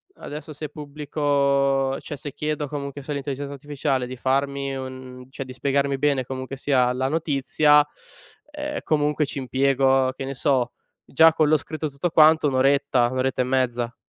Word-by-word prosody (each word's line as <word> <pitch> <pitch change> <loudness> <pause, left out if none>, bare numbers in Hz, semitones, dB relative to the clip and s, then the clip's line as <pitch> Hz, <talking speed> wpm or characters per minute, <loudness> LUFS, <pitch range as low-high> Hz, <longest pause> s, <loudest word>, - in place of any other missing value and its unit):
adesso 150 +1 -8
se 150 +1 -6
pubblico 140 -2 0
cioè 145 - -7
se 145 0 -7
chiedo 150 -1 -2
comunque 140 0 -6
sull'intelligenza 140 0 -4
artificiale 140 -2 -2
di 130 0 -7
farmi 140 +1 -1
un 130 -1 -8
cioè 135 0 -7
di 130 - -9
spiegarmi 140 +1 0
bene 140 -2 +1
comunque 130 +1 -6
sia 130 -3 +2
la 130 +1 -1
notizia, 150 0 +3 0.7
ehm, 295 -1 -4
comunque 150 0 +1
ci 140 - -7
impiego, 135 0 +2
che 135 - -5
ne 135 - -4
so, 130 -2 0 0.3
già 160 +3 +5
con 155 -1 +2
lo 155 +1 +4
scritto 155 +1 -5
tutto 140 +5 -2
quanto 155 -1 +5
1 135 - -1
oretta, 135 -2 +3
1 130 - -4
oretta 130 0 0
e - - 0
mezza. 125 -2 -1
140 Hz, 165 wpm, -23 LUFS, 130-150 Hz, 0.7 s, già